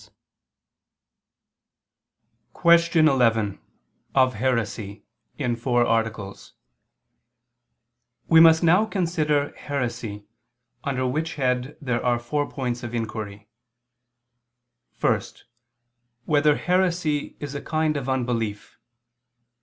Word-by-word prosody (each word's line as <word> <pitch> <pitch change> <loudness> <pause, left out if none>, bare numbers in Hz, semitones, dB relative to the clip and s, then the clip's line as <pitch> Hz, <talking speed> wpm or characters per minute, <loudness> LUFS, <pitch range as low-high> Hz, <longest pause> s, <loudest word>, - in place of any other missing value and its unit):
_______________________ - - -19 2.4
QUESTION 170 -2 +4
11 115 -7 +2 0.6
OF 130 -1 +4
HERESY 110 -3 -2 0.3
(In 125 -5 -1
Four 120 0 +1
Articles) 110 -4 -2 1.7
We 165 - +6
must 160 0 +7
now 180 +6 +4
consider 155 -7 0
heresy: 120 -7 -4 0.6
under 130 -2 -1
which 155 +6 -2
head 125 -1 -1
there 125 -4 -2
are 120 -1 +2
four 145 +5 -2
points 125 -3 -3
of 120 0 -6
inquiry: 105 -3 -5 1.5
(1) - - +2 1.0
Whether 150 0 +3
heresy 175 -5 0
is 145 -1 -6
a 145 - -5
kind 155 -1 0
of 135 -2 -3
unbelief? 120 -5 -3
130 Hz, 90 wpm, -24 LUFS, 115-155 Hz, 2.4 s, must